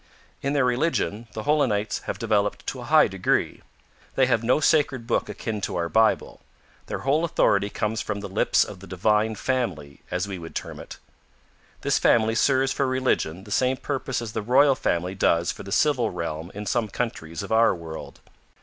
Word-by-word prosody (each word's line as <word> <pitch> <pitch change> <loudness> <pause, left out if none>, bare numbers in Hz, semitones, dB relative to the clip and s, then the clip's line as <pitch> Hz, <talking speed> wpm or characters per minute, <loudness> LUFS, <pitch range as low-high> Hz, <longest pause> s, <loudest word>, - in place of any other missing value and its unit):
In 140 - -1
their 140 -3 +2
religion, 125 -4 0
the 110 - -5
Holenites 115 -8 +1
have - - -3
developed 105 -2 0
to - - -4
a - - -7
high - - +5
degree. - - -1 0.5
They 135 - +4
have 125 -3 +2
no 125 +5 +3
sacred 145 -5 +2
book 115 - 0
akin 110 -3 -4
to - - -3
our 85 -1 -1
Bible. 110 +3 +1 0.5
Their - - -4
whole 150 +4 +2
authority 100 -11 +2
comes 105 +2 -2
from 105 -1 -3
the 100 - -6
lips 95 - +2
of 95 - -9
the 95 - -12
Divine 105 +4 +1
Family, 95 - -3
as 90 +2 -2
we 95 -3 -5
would 80 -1 -10
term - - -5
it. - - -10 0.8
This - - +1
family 110 -1 +3
serves 130 +3 +2
for 140 - 0
religion 130 -9 0
the 105 - -13
same 130 +4 +2
purpose 130 -4 -3
as 110 - -6
the 110 - -2
Royal 135 +6 +5
Family 90 -6 -1
does 85 -3 +2
for - - -9
the 100 - -9
civil 125 -1 +2
realm 85 0 -5
in 105 +1 -5
some 115 +1 0
countries 85 -8 -4
of - - -8
our 115 -2 +4
world. 80 -2 -9
110 Hz, 190 wpm, -25 LUFS, 95-130 Hz, 0.8 s, high